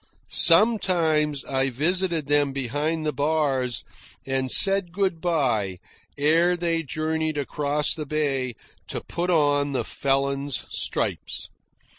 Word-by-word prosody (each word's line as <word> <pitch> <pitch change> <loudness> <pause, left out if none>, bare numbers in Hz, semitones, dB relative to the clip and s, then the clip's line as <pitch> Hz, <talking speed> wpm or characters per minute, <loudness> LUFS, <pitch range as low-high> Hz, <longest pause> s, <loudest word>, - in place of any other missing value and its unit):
Sometimes 165 -7 +3
I 135 0 0
visited 165 +4 0
them 145 -1 +1
behind 145 +5 -2
the 150 - -1
bars 140 -3 0 0.4
and 135 -1 -1
said 195 +3 +5
good 185 -3 -1
bye 120 - 0 0.4
ere 165 +5 +3
they 165 -1 -1
journeyed 155 +1 -2
across 145 +1 0
the 155 -2 -6
bay 135 -5 -2 0.3
to - - -5
put 175 +1 -4
on 145 -4 +1
the 130 - -1
felon's 140 0 -1
stripes. - - -1
150 Hz, 115 wpm, -24 LUFS, 135-165 Hz, 0.4 s, said